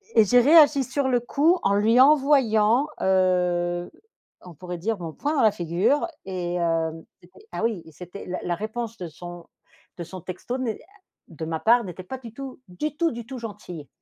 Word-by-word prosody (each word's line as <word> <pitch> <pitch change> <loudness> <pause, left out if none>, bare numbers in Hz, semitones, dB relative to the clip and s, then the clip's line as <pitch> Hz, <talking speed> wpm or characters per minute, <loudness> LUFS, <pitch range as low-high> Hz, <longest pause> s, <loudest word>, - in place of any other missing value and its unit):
Et 220 - +7
j'ai 245 +5 +5
réagi 290 -1 +6
sur 265 +1 -1
le 245 -2 +2
coup, 305 +9 +2
en 200 - +2
lui 225 +4 +3
envoyant, 265 -3 +4
heu, 180 -2 +1 0.5
on 180 -2 -12
pourrait 180 +3 -7
dire, 210 +3 -2
mon 165 -2 -5
poing 295 +2 -2
dans 275 - +2
la 215 - +5
figure 180 - 0 0.2
et 180 -2 -3
hem, 165 -1 -1 0.2
c'était 180 - -20
ah - - -4
oui, 220 -7 -1
c'était 180 +5 -10
la 180 - -3
la 175 -1 -1
réponse 225 +3 -5
de 175 - -6
son 175 +1 -10 0.5
de 170 - -5
son 180 +1 -9
texto 185 +8 -5
n'est, 235 -4 -3
ah, 410 +1 -24 0.3
de 160 -1 -7
ma 160 0 -3
part, 235 +1 +4
n'était 185 -2 -8
pas 260 +9 -6
du 235 -4 -11
tout, 270 +1 -8
du 295 +12 -4
tout, 335 0 +1
du 235 -2 -7
tout 260 +2 -7
gentille. 200 -9 -8
210 Hz, 195 wpm, -24 LUFS, 175-255 Hz, 0.5 s, Et